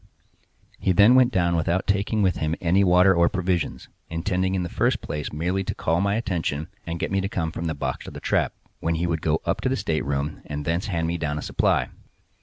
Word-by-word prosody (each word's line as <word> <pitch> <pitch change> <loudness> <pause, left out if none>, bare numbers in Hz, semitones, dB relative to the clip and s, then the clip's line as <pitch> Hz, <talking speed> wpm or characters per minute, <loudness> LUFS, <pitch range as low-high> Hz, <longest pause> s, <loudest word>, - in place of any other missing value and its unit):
He 95 - +2
then 105 +6 +7
went 130 -1 +5
down 85 -4 +2
without 85 +3 0
taking 100 +2 +1
with 95 -2 +2
him 80 +1 -1
any 90 +3 +3
water 90 +1 +5
or 85 -1 +4
provisions, 90 -2 -2 0.2
intending 95 +3 -1
in 90 - 0
the - - -2
first - - +1
place 75 0 -5
merely 90 +5 -1
to - - -4
call 85 +3 0
my 100 +1 +1
attention, 85 -8 -2 0.2
and 85 0 -3
get - - -2
me 100 0 +1
to 95 - -2
come 80 -5 -2
from 85 - -5
the 80 -2 -1
box 70 - -3
to - - -6
the - - -8
trap,—when 85 0 -2
he 85 +2 -1
would 80 -2 -1
go 80 0 0
up - - -1
to - - 0
the - - +1
stateroom 70 +2 -2
and 75 -1 -4
thence 85 +5 -1
hand 85 -5 -1
me 85 +1 -2
down 75 -2 -2
a - - -4
supply. - - +1
85 Hz, 225 wpm, -24 LUFS, 80-95 Hz, 0.2 s, then